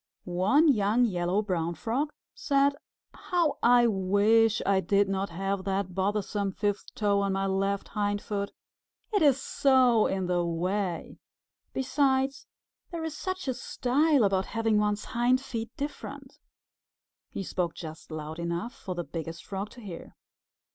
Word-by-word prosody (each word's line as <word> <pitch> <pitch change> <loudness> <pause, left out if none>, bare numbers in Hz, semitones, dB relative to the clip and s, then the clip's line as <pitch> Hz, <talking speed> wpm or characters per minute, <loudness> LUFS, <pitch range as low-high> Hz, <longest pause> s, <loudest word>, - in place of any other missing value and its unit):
One 190 - +3
young 225 -2 +3
Yellow 180 0 0
Brown 170 -4 -1
Frog 255 - -1 0.2
said, 280 - +2 0.4
"How 345 -4 0
I 240 0 +6
wish 215 +2 +3
I 195 -1 +3
did 200 +1 +2
not 195 0 -1
have 195 +3 -2
that 195 -1 -1
bothersome 200 +1 -1
fifth 205 0 -2
toe 200 -1 +2
on 200 -1 0
my 195 0 0
left 195 +1 -1
hindfoot! 205 -1 -2 0.6
It 410 - +3
is 280 -4 +5
so 255 -5 +4
in 190 -1 -1
the 175 -1 +1
way! 175 +2 -2 0.5
Besides, 265 0 0 0.4
there 335 -3 -5
is 320 -1 -4
such 375 +1 -4
a 260 - +1
style 275 +3 +2
about 195 -1 +1
having 225 -1 +1
one's 210 0 0
hind 245 +2 +2
feet 230 -4 -5
different." 290 +1 -7 0.9
He 195 - -5
spoke 175 -2 -2
just 160 -1 -9
loud 155 0 -6
enough 170 +8 -3
for 185 -3 -6
the 175 - -2
Biggest 165 0 -6
Frog 195 +1 -4
to 245 - -13
hear. 185 -6 -9
205 Hz, 145 wpm, -28 LUFS, 190-250 Hz, 0.9 s, I